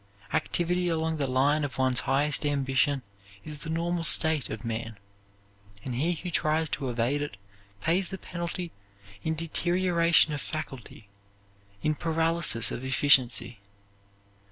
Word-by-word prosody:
Activity 180 +1 0
along 160 -1 -1
the 140 -2 -1
line 140 +4 +2
of 140 -2 -4
one's 130 -1 +3
highest 145 +2 +1
ambition 140 -1 +1 0.4
is 150 +2 -9
the 160 - -7
normal 170 +1 -1
state 160 -3 +4
of - - -6
man, 115 -1 -4 0.9
and 130 - -4
he 155 +9 0
who 175 +2 -6
tries 155 0 +1
to 135 -3 -2
evade 120 +4 0
it 145 -9 -5 0.5
pays 175 +3 +1
the 190 - -6
penalty 175 -1 -5 0.5
in 160 +8 -2
deterioration 170 0 +2
of 145 - -3
faculty, 135 -8 -7 0.8
in 155 - +2
paralysis 165 -6 +3
of 125 - -5
efficiency. 125 -4 +3
150 Hz, 130 wpm, -27 LUFS, 130-165 Hz, 0.9 s, state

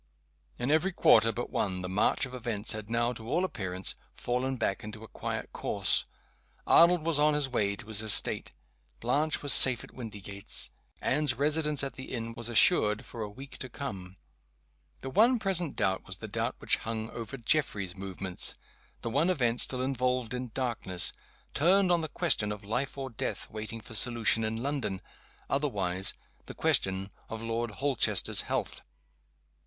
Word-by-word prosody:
In 125 +3 -2
every 160 +5 +2
quarter 115 -9 +4
but 120 +2 -6
one 95 -3 -2
the - - -4
march 95 +7 +1
of 130 - -11
events 115 -4 -2
had 110 -1 -3
now, 120 +1 0
to 115 -1 -9
all 175 +6 +1
appearance, 95 - -3 0.2
fallen 130 +2 -2
back 100 -4 -2
into 105 +1 -9
a - - -10
quiet - - -6
course. - - +1 0.6
Arnold 170 -1 +5
was 165 -3 +1
on 150 0 +3
his 145 -2 +1
way 105 -6 -1
to 100 - -11
his 110 -1 +2
estate; 110 -2 +3 0.5
Blanche 145 +7 0
was 145 - +9
safe 130 -2 +11
at - - -14
Windygates; 100 -4 -6 0.3
Anne's 145 -2 +1
residence 150 +1 +2
at 135 - -4
the 130 - -9
inn 115 -2 -5
was 120 0 -5
assured 105 -2 +4
for 115 - -9
a 105 - -4
week 135 +6 -12
to 130 - -6
come. 95 -9 -7 0.8
The 135 - -6
one 235 - +4
present 180 - +1
doubt 95 0 -1
was 95 - -3
the - - -8
doubt - - -3
which - - +2
hung 110 0 -5
over 115 +2 -7
Geoffrey's 115 - 0
movements. 95 -1 -2 0.5
The 115 - -3
one 150 +8 +1
event 125 -9 0
still 130 -1 -1
involved 125 -2 -1
in 125 0 -5
darkness 115 -8 0 0.4
turned 185 +5 +3
on 175 -1 +2
the 160 - -5
question 120 -12 0
of 105 0 -7
life 125 +7 -2
or 135 -1 -5
death 115 - -5
waiting 110 +1 -6
for 115 - -12
solution 115 0 +1
in 110 +2 -3
London 135 -9 -3 0.4
otherwise, 95 -10 -1 0.3
the - - -9
question 95 +1 0 0.2
of 115 0 -7
Lord 115 +1 -2
Holchester's 135 +4 0
health. - - -3
120 Hz, 170 wpm, -29 LUFS, 105-140 Hz, 0.8 s, safe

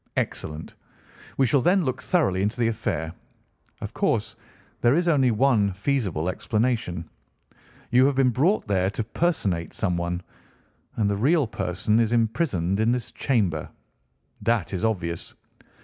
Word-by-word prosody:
"Excellent! 75 +1 -3 0.6
We 135 - +4
shall 130 +3 +3
then 180 +6 +3
look 130 +3 -2
thoroughly 145 - +1
into 105 +5 -1
the 115 - +3
affair. 85 -8 -3 0.7
Of - - -6
course - - 0 0.5
there 120 +3 +4
is 175 +1 +1
only 140 -6 +4
one 110 -4 +3
feasible 100 - -1
explanation. 110 -4 -1 0.8
You 130 +2 +6
have 140 - +1
been 130 -1 +3
brought 160 - +1
there 95 -2 +1
to 110 - -3
personate 105 - -1
someone, 90 -2 -1 0.7
and 105 - +1
the 100 - +1
real 145 +7 +3
person 105 0 0
is 115 0 +2
imprisoned 110 - +1
in 110 +2 +3
this 125 -3 -3
chamber. 100 - 0 0.7
That 115 -7 0
is 95 - -2
obvious. 90 -7 -2
110 Hz, 140 wpm, -25 LUFS, 90-130 Hz, 0.8 s, You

